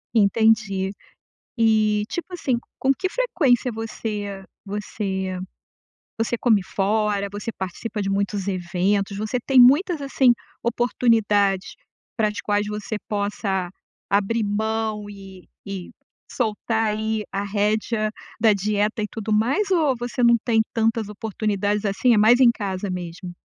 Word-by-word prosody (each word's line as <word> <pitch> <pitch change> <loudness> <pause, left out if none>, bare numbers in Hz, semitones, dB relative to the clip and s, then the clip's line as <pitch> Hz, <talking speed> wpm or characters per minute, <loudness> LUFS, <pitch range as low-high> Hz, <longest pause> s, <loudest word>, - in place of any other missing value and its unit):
Entendi. 210 -2 +3 0.7
E 215 -2 +3
tipo 345 +5 -5
assim, 270 -8 0 0.2
com 270 - +3
que 325 +7 -1
frequência 290 - +1
você 210 -3 -5 0.2
você 195 -2 -3 0.8
você 230 +1 0
come 220 -4 +3
fora? 200 +1 0
Você 205 +3 -5
participa 200 +4 -4
de 195 - -2
muitos 200 0 -1
eventos? 190 +2 0
Você 215 +4 -2
tem 260 +2 +3
muitas 295 +6 +5
assim, 270 -3 +4 0.3
oportunidades 220 -5 +1 0.4
para 220 -2 +3
as 210 - -4
quais 205 0 0
você 210 0 -4
possa 200 -3 -1 0.4
abrir 205 +3 +1
mão, 215 0 -2
e 195 -2 -12 0.2
e 195 -3 -6 0.4
soltar 225 -1 -1
aí, 220 0 -1
a 195 +1 -2
rédea 215 +2 0 0.3
da 220 -1 +6
dieta 210 +2 0
e - - -2
tudo 220 -1 -5
mais? 270 - +1
Ou 310 -7 +3
você 245 +1 -3
não 235 0 +6
tem 225 -2 +3
tantas 225 -1 +1
oportunidades 210 -1 -2
assim, 210 +5 +3
é - - +3
mais 220 +4 +6
em 245 -2 +7
casa 200 -3 -4
mesmo? 180 0 -6
210 Hz, 135 wpm, -23 LUFS, 200-230 Hz, 0.8 s, em